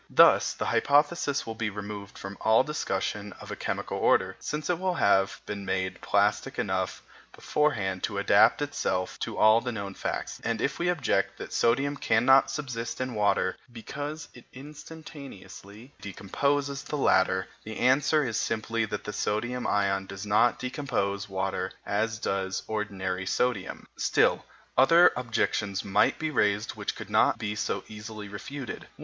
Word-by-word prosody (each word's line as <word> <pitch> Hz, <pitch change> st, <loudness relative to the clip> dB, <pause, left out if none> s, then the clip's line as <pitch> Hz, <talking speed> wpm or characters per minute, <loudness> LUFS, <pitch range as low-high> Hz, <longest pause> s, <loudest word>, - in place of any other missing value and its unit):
Thus -, -, +5 dB
the -, -, -3 dB
hypothesis 145 Hz, 0 st, +2 dB
will 115 Hz, -, -4 dB
be 110 Hz, -1 st, -2 dB
removed 100 Hz, 0 st, -7 dB
from 100 Hz, +1 st, -7 dB
all 110 Hz, +1 st, +5 dB
discussion 105 Hz, -8 st, -3 dB
of -, -, -11 dB
a -, -, -3 dB
chemical -, -, -3 dB
order, -, -, +3 dB
since 150 Hz, -1 st, -4 dB
it 180 Hz, -2 st, 0 dB
will 185 Hz, -1 st, 0 dB
have 95 Hz, -, +2 dB
been 100 Hz, -1 st, -5 dB
made 95 Hz, -1 st, -2 dB
plastic -, -, +1 dB
enough -, -, -2 dB, 0.3 s
beforehand 100 Hz, -12 st, 0 dB
to 100 Hz, -, -5 dB
adapt 100 Hz, +7 st, +4 dB
itself 90 Hz, -10 st, -2 dB
to -, -, -4 dB
all 110 Hz, +1 st, +6 dB
the 125 Hz, -, -3 dB
known 100 Hz, -3 st, -5 dB
facts; -, -, -4 dB
and 115 Hz, -1 st, -1 dB
if 140 Hz, +4 st, -1 dB
we 175 Hz, +1 st, +1 dB
object 165 Hz, -8 st, 0 dB
that -, -, -8 dB
sodium 135 Hz, +5 st, +2 dB
cannot 135 Hz, 0 st, +4 dB
subsist 130 Hz, -5 st, -4 dB
in 130 Hz, -1 st, -2 dB
water 105 Hz, -3 st, +1 dB
because 145 Hz, +6 st, -6 dB
it 125 Hz, -, -15 dB
instantaneously 135 Hz, -, -11 dB
decomposes 140 Hz, +8 st, -1 dB
the 150 Hz, -, -4 dB
latter, 95 Hz, -7 st, +2 dB, 0.2 s
the 110 Hz, 0 st, -7 dB
answer 145 Hz, +4 st, +3 dB
is 115 Hz, -3 st, -2 dB
simply 115 Hz, 0 st, -1 dB
that 105 Hz, -1 st, -5 dB
the 105 Hz, -, -5 dB
sodium 120 Hz, +4 st, -2 dB
ion 95 Hz, -1 st, +1 dB
does 100 Hz, +2 st, -7 dB
not 105 Hz, +4 st, +3 dB
decompose 105 Hz, -7 st, -2 dB
water 95 Hz, -1 st, -2 dB
as 110 Hz, +2 st, -1 dB
does 95 Hz, -2 st, -2 dB
ordinary 95 Hz, -3 st, -3 dB
sodium. 115 Hz, -3 st, -1 dB
Still, -, -, +2 dB, 0.3 s
other 165 Hz, +7 st, +7 dB
objections 110 Hz, -4 st, -1 dB
might 95 Hz, -, +3 dB
be 155 Hz, -1 st, -2 dB
raised 105 Hz, -4 st, +1 dB
which -, -, -4 dB
could -, -, -9 dB
not -, -, +4 dB
be 105 Hz, -1 st, -3 dB
so 105 Hz, -, -2 dB
easily 110 Hz, -1 st, -8 dB
refuted. 130 Hz, +6 st, -7 dB
110 Hz, 155 wpm, -28 LUFS, 100-140 Hz, 0.3 s, other